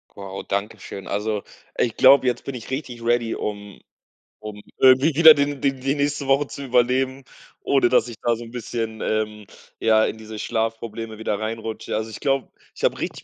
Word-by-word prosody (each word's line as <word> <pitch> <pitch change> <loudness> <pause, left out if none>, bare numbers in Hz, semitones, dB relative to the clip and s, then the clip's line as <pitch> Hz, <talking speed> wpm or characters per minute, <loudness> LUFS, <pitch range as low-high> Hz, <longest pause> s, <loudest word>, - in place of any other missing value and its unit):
Wow, 95 -1 -7
Dankeschön. 100 -1 -5
Also, 105 0 -2 0.3
ich 115 - 0
glaube, 130 0 +6
jetzt 120 -1 -1
bin 135 - -5
ich 115 - -9
richtig 130 -4 -5
ready, 120 -1 +1
um 105 -1 -6 0.6
um 105 -1 -8 0.2
irgendwie 130 +4 +5
wieder 160 0 +10
die 145 -1 -1
die 135 0 +1
die 135 +2 -1
nächste 145 -1 -1
Woche 135 +1 +3
zu 140 - -8
überleben, 130 +1 +1 0.4
ohne 135 -3 +2
dass 125 -2 +3
ich 120 - -8
da 120 -1 +1
so 120 - -8
'n 115 - -12
bisschen, 115 -2 -4
ähm, 105 -1 -2 0.4
ja, 110 -1 +4
in - - -3
diese 110 -1 -9
Schlafprobleme 115 -1 -3
wieder 105 -2 -2
reinrutsche. 110 0 -4
Also, 110 +1 -3
ich - - -8
glaube 135 -2 0 0.3
ich - - -11
habe - - +1
richtig - - -5
115 Hz, 185 wpm, -23 LUFS, 110-130 Hz, 0.6 s, wieder